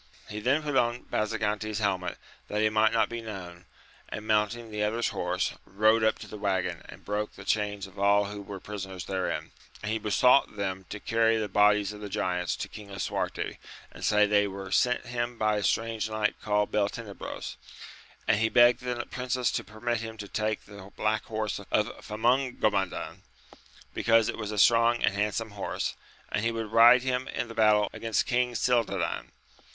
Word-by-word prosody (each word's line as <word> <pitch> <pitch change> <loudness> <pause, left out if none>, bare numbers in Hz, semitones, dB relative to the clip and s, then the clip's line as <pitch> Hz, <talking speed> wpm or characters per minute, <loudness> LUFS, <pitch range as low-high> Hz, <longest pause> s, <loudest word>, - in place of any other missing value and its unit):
He 105 - -5
then 130 +8 +2
put 145 -2 -2
on 120 -1 +2
Basagante's 110 -1 -1
helmet 95 -4 -1 0.3
that 105 - -2
he 110 - +4
might 110 0 +3
not 115 - +3
be 115 0 -5
known, 90 -5 -8 0.4
and 105 - -6
mounting 110 +2 0
the 105 0 -3
other's 110 +3 +1
horse, - - -1
rode 110 +3 +3
up 110 - +3
to - - -10
the 105 - -9
waggon 95 -2 -1
and - - -12
broke 105 +1 -2
the - - -11
chains 105 -2 0
of 95 +1 -13
all 100 +1 +4
who 100 0 -6
were 100 0 -7
prisoners 95 -3 -6
therein, 95 -1 -2 0.3
and 105 - -2
he 110 - 0
besought 120 +4 +4
them 95 -2 -3
to 105 - -6
carry 115 0 +2
the 110 -1 -1
bodies 105 +1 +3
of 105 - -10
the 105 - -6
giants 90 -1 -1
to - - -5
King 105 -1 -11
Lisuarte, 100 0 -3 0.3
and - - -11
say 105 0 +4
they 105 0 +3
were 95 -1 -7
sent 125 +3 +2
him 120 0 -3
by 110 -1 +2
a 105 - -2
strange 110 0 0
knight 110 -1 0
called 105 0 +1
Beltenebros; 105 0 -3 0.7
and 105 - +3
he 110 0 +2
begged 120 0 +6
the 125 -1 -3
princess 125 -1 -1
to - - -2
permit 115 +2 -2
him 110 0 -7
to 105 -1 -7
take 110 +1 -2
the 100 -1 -12
black 110 0 0
horse 110 -2 -3
of 105 +2 -1
Famongomadan, 110 -4 0 0.7
because 115 -1 +3
it - - -3
was 105 -1 -4
a 105 - -4
strong 115 +3 +5
and - - +3
handsome 105 +2 -1
horse, 100 -1 -3 0.4
and 105 - 0
he 115 - +2
would 115 -2 -4
ride 120 +2 +7
him 130 0 -1
in 120 - -3
the - - -7
battle 105 -2 +4
against 115 -1 0
King 125 -1 +1
Cildadan. 105 -7 0
105 Hz, 185 wpm, -28 LUFS, 100-115 Hz, 0.7 s, ride